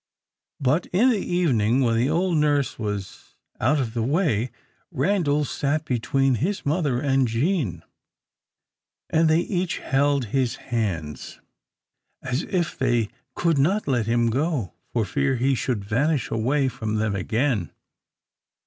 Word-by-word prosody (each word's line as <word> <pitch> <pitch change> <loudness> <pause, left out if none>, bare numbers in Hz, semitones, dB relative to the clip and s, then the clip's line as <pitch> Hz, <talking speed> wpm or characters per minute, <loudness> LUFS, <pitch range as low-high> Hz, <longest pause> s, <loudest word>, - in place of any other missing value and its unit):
But 145 +5 +1
in 235 +8 +3
the 220 - +1
evening, 130 -9 +2
when 115 -3 +2
the 120 +4 +2
old 175 +2 +1
nurse 145 -4 +1
was 105 -3 -5 0.2
out 145 +6 +2
of 120 -5 -2
the 120 - -1
way, 130 - +1 0.4
Randal 150 -2 +1
sat 150 +3 -1
between 135 +2 +1
his 190 +6 -1
mother 145 -4 +1
and 135 -2 +2
Jean, 115 - -1 1.3
and 160 0 +3
they 160 +2 +4
each 180 -1 -2
held 140 -1 +1
his 130 -3 +1
hands, 90 -11 -4 0.8
as 130 +2 -1
if 175 -3 -2
they 120 -5 +1 0.3
could 165 -4 +1
not 190 +8 +1
let 120 -5 +1
him 115 0 +2
go, 135 - -1 0.2
for 115 -3 0
fear 140 +7 0
he 130 +3 +1
should 120 -5 -2
vanish 135 +5 0
away 135 +5 +1
from 110 -4 -3
them 105 -2 0
again. 110 - 0
135 Hz, 140 wpm, -24 LUFS, 115-155 Hz, 1.3 s, they